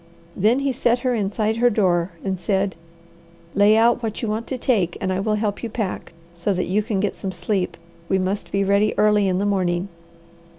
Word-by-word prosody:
Then 225 +7 +2
he 275 -1 +1
set 240 -1 +2
her 250 - +2
inside 215 +1 -1
her 245 +1 +4
door 185 -5 +1
and 190 -2 -2
said, 195 +1 0 0.8
"Lay 205 +2 +5
out 235 +2 +4
what 220 -2 -3
you - - 0
want 215 +2 -2
to 260 - -3
take 205 -9 0
and 185 - -1
I 185 - -1
will 215 +2 0
help 210 -1 -2
you 235 - -4
pack, 215 -3 -4 0.2
so 175 +3 -1
that 180 - -1
you 200 +4 +1
can 210 -2 -2
get 205 0 -1
some 190 - -4
sleep. 180 +1 -2 0.3
We 190 - +3
must 190 +2 -2
be 200 0 +1
ready 200 +2 +2
early 210 -1 +4
in 185 -1 +1
the 200 - 0
morning." 185 -2 0
205 Hz, 210 wpm, -22 LUFS, 190-220 Hz, 0.8 s, Lay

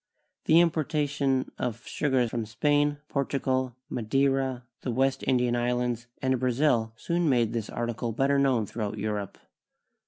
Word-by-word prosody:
The 160 - +6
importation 145 -5 0
of 120 -2 -3
sugar 130 -4 +1
from 115 -1 -3
Spain, 145 +5 +1
Portugal, 130 -3 -1
Ma 125 - -4
deira, 135 +1 +1 0.2
the - - -4
West 130 +3 +1
Indian 125 -2 +2
islands, 120 0 -1 0.2
and 130 -1 +2
Brazil 125 -2 +2
soon 170 +7 0
made 120 -4 +2
this 115 -3 -3
article 120 0 -3
better 135 +4 +2
known 130 -5 +2
throughout 105 0 -4
Europe. 105 -1 -3
130 Hz, 135 wpm, -27 LUFS, 120-140 Hz, 0.2 s, The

